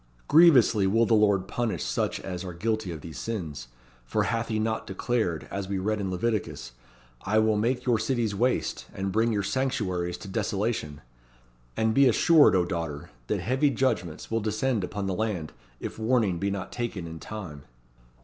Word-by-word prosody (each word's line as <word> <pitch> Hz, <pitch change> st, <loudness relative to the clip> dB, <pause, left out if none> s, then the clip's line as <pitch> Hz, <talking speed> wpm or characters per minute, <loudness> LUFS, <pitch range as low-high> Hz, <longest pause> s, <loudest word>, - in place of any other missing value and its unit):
Grievously 130 Hz, -, +6 dB
will 115 Hz, +4 st, +3 dB
the 115 Hz, -, +2 dB
Lord 100 Hz, -3 st, +3 dB
punish 120 Hz, -3 st, -2 dB
such -, -, -1 dB
as 90 Hz, -1 st, -5 dB
are 90 Hz, -2 st, -6 dB
guilty 110 Hz, 0 st, -1 dB
of 80 Hz, -3 st, -7 dB
these 80 Hz, -6 st, -8 dB
sins, 75 Hz, -, -5 dB, 0.4 s
for -, -, 0 dB
hath 115 Hz, 0 st, -1 dB
He 110 Hz, -, -1 dB
not 110 Hz, +1 st, -1 dB
declared, 95 Hz, -4 st, -1 dB
as 100 Hz, -1 st, -4 dB
we 100 Hz, -, -1 dB
read 105 Hz, +2 st, -1 dB
in 95 Hz, -, -2 dB
Leviticus, 90 Hz, -, -2 dB, 0.5 s
'I 105 Hz, +3 st, +1 dB
will 110 Hz, 0 st, +3 dB
make 120 Hz, +4 st, 0 dB
your 120 Hz, -3 st, +2 dB
cities 115 Hz, -2 st, 0 dB
waste, 125 Hz, +6 st, 0 dB
and 95 Hz, 0 st, -2 dB
bring 115 Hz, +3 st, +2 dB
your 100 Hz, -2 st, 0 dB
sanctuaries 95 Hz, -8 st, -1 dB
to -, -, -10 dB
desolation?' 100 Hz, -7 st, -2 dB, 0.8 s
And 110 Hz, 0 st, +2 dB
be 135 Hz, +3 st, +6 dB
assured, 150 Hz, -, +5 dB
O 90 Hz, -1 st, +3 dB
daughter, 80 Hz, -4 st, -4 dB, 0.2 s
that -, -, -1 dB
heavy 135 Hz, +5 st, +2 dB
judgments 115 Hz, -, -1 dB
will 115 Hz, 0 st, +1 dB
descend 110 Hz, +1 st, 0 dB
upon 100 Hz, +2 st, -4 dB
the 95 Hz, -, -1 dB
land, 90 Hz, -6 st, -2 dB, 0.3 s
if -, -, -6 dB
warning 110 Hz, -6 st, +1 dB
be 100 Hz, -, 0 dB
not 100 Hz, -2 st, -4 dB
taken 115 Hz, -7 st, -4 dB
in 80 Hz, -1 st, -8 dB
time." 85 Hz, -7 st, -7 dB
105 Hz, 180 wpm, -27 LUFS, 90-115 Hz, 0.8 s, Grievously